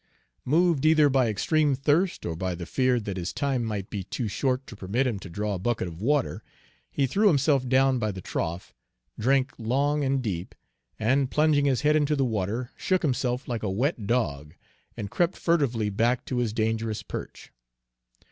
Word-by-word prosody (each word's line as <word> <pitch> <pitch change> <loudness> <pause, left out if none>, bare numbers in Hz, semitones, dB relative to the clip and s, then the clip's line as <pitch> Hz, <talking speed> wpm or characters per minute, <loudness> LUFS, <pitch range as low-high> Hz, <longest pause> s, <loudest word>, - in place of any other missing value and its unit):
Moved 165 +1 +2
either 155 -2 +5
by 130 -2 +3
extreme 145 +7 +1
thirst 155 +7 +1
or 80 - -2
by 90 +1 -2
the 85 0 -6
fear 130 +4 +1
that 100 -3 -5
his 90 -1 -3
time 135 -4 -1
might 105 -4 -4
be 100 -2 -3
too 110 +5 -4
short 130 +5 -1
to - - -10
permit 105 +7 -1
him 115 -6 -1
to 95 - -10
draw 105 +4 -2
a 95 - -3
bucket 110 -1 -1
of 85 +1 -9
water, 140 +3 0 0.5
he 140 - 0
threw 200 - +2
himself 140 -6 +3
down 130 0 +3
by 110 -2 -1
the 95 - -7
trough, 85 0 -4 0.5
drank 130 +3 +2
long 140 +6 +1
and 135 -1 0
deep, 95 -5 -4 0.4
and 130 +4 +1
plunging 150 -1 +3
his 135 -3 +2
head 150 0 +3
into 150 0 +2
the 135 -2 +1
water, 110 +2 -2
shook 185 -1 0
himself 125 -3 -1
like 120 -2 -3
a 105 - -2
wet 115 - -1
dog, 75 - -1 0.4
and 105 -4 -5
crept 175 0 +1
furtively 125 -11 +1
back 120 +5 +1
to 130 - -3
his 120 -3 0
dangerous 110 0 -1
perch. - - -8
125 Hz, 185 wpm, -26 LUFS, 105-140 Hz, 0.5 s, either